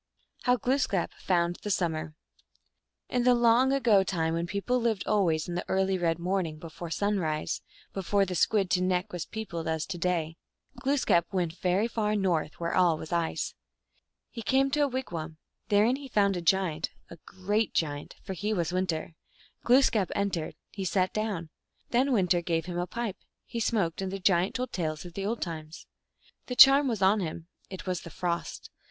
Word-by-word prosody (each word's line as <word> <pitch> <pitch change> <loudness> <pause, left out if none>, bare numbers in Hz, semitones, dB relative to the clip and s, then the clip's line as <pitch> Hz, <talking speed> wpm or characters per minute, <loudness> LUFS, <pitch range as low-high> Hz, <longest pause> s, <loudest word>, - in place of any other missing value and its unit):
How 250 -1 +4
Glooskap 250 -8 0
found 175 -1 0
the 210 - -6
Summer. 160 -5 -1 0.9
In 250 - 0
the 250 0 +5
long 240 +2 +4
ago 235 -8 +4
time 165 -4 -1
when 170 +1 -1
people 205 +6 -1
lived 225 -5 0
always 165 -7 +1
in 175 - -4
the 175 - -2
early 190 0 +2
red 170 -3 +1
morning, 175 -2 -1
before 165 +1 -8
sunrise, 165 -5 -1 0.3
before 195 +1 +1
the 185 - -4
Squid 195 +2 +2
to 180 - +3
neck 185 +2 0
was 175 -3 -4
peopled 170 -7 -5
as 160 -1 -1
to 180 -3 -6
day, 165 -2 -1 0.4
Glooskap 260 -11 +2
went 175 -4 -1
very 185 +5 +2
far 215 -2 0
north, 175 -6 0
where 170 0 -2
all 175 -3 +4
was 155 - -8
ice. 165 -2 -1 0.8
He 230 - -6
came 270 +4 +2
to 300 - +1
a - - +3
wigwam. 170 - -5 0.3
Therein 215 +5 +4
he 280 -1 -9
found 200 -5 +2
a 175 - -3
giant, 170 -2 +1 0.2
a 170 - -9
great 205 +4 -1
giant, 145 -3 -2
for 190 - -5
he 210 +4 -2
was 170 -2 -1
Winter. 175 -3 -1 0.5
Glooskap 240 -6 +4
entered; 195 -5 -1 0.2
he 195 - -5
sat 185 0 +1
down. 200 -7 -3 0.4
Then 255 +3 +2
Winter 180 -6 +3
gave 165 -2 -1
him 175 -1 -4
a 175 - -2
pipe; 230 0 -4 0.3
he 235 - -5
smoked, 200 -7 0
and 190 -1 -3
the 195 - -3
giant 185 -1 +2
told 255 -1 -2
tales 155 -2 -3
of 175 - -9
the 195 +2 -3
old 230 +2 -1
times. 160 -2 -7 0.6
The 250 - -3
charm 275 +1 +8
was 220 -6 -1
011 200 +3 +5
him; 165 +1 -8 0.2
it 190 - -8
was 180 -2 -2
the 170 - -9
Frost. 170 +1 -4
185 Hz, 185 wpm, -28 LUFS, 170-215 Hz, 0.9 s, charm